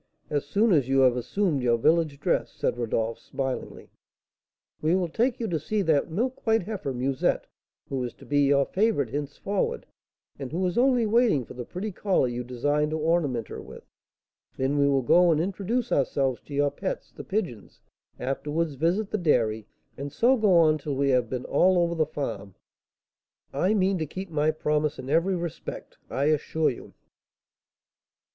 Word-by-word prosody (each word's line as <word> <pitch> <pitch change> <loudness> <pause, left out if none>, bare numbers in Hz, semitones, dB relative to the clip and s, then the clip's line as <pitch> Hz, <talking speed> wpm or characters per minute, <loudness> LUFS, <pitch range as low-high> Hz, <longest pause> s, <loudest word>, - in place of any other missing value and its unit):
As 145 -2 0
soon 210 +8 +2
as 140 -5 +2
you 135 0 +4
have 130 -2 +5
assumed 150 - 0
your 120 -1 +2
village 155 +2 +2
dress," - - 0
said - - -1
Rodolph, 115 -1 -2
smilingly, 130 -1 -5 0.9
"we 160 +3 +2
will 185 -2 +1
take 240 +9 0
you 230 - -2
to 165 -3 -1
see 205 +7 -1
that 160 -2 +2
milk 245 +10 -2
white 225 -2 +3
heifer, 195 -8 -4
Musette, 130 +1 0 0.4
who 130 -2 -2
is 120 - -5
to - - -15
be 145 0 +1
your 140 0 +4
favourite 195 - +1
henceforward, 145 +8 -2 0.5
and 135 -3 -6
who 180 +4 -1
is 180 - -1
only 250 -1 +3
waiting 215 - +3
for - - -11
the 125 -1 -7
pretty 205 +4 -5
collar 190 -7 +1
you 120 0 -3
designed 145 +5 0
to 155 - -2
ornament 150 -8 0
her - - -7
with; - - -12 0.7
then 135 +2 0
we 140 - +4
will 135 -2 +2
go 175 +7 +5
and 155 - +2
introduce 200 +7 -2
ourselves 135 -2 +1
to 145 - -12
your 145 0 +2
pets, 190 +7 -5
the - - -9
pigeons, 175 - -4 0.4
afterwards 150 +5 -2
visit 175 +9 0
the 215 - 0
dairy, 110 - +1 0.3
and 140 +1 -5
so 240 - +3
go 210 -7 +4
on 155 -2 +4
till 145 -1 -3
we 140 +1 +1
have 125 -3 +2
been 130 -1 -4
all 185 0 +3
over 170 -1 +2
the 160 -2 +1
farm. 110 -10 -5 1.0
I 185 +10 +2
mean 190 -2 +2
to 155 - -2
keep 190 +4 -7
my 155 0 +2
promise 150 -1 0
in 130 - -6
every 170 +4 +2
respect, 170 -3 -6
I 135 - -1
assure 155 +1 +1
you." 120 - -11
150 Hz, 180 wpm, -26 LUFS, 135-185 Hz, 1.0 s, have